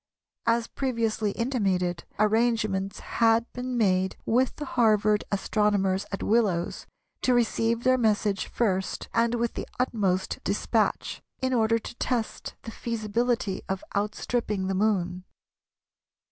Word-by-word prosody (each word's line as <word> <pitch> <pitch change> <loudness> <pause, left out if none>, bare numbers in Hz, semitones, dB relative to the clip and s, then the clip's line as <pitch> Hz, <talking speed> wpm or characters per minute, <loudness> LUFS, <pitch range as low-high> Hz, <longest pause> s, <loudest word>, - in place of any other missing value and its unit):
As 230 0 +3
previously 225 -5 -1
intimated, 195 -8 0
arrangements 215 -3 +1 0.2
had 230 0 +5
been 250 0 -3
made 190 -4 +2
with 250 +3 +2
the 295 - -5
Harvard 215 -4 +3
astronomers 200 -1 +1
at 195 - -3
Willows 205 -6 +1 0.3
to 255 - +3
receive 230 0 +1
their 255 0 +4
message 210 -3 +1
first 190 -5 -1
and 230 +1 +2
with 235 0 -1
the - - -5
utmost 200 -7 0
despatch, - - 0 0.2
in 260 -1 0
order 225 -1 +3
to 230 - -8
test 235 -4 -2
the 225 - -7
feasibility 230 -2 -1
of 190 0 -2
outstripping 210 0 -1
the 195 - 0
Moon. 185 -3 0
220 Hz, 120 wpm, -27 LUFS, 195-235 Hz, 0.3 s, had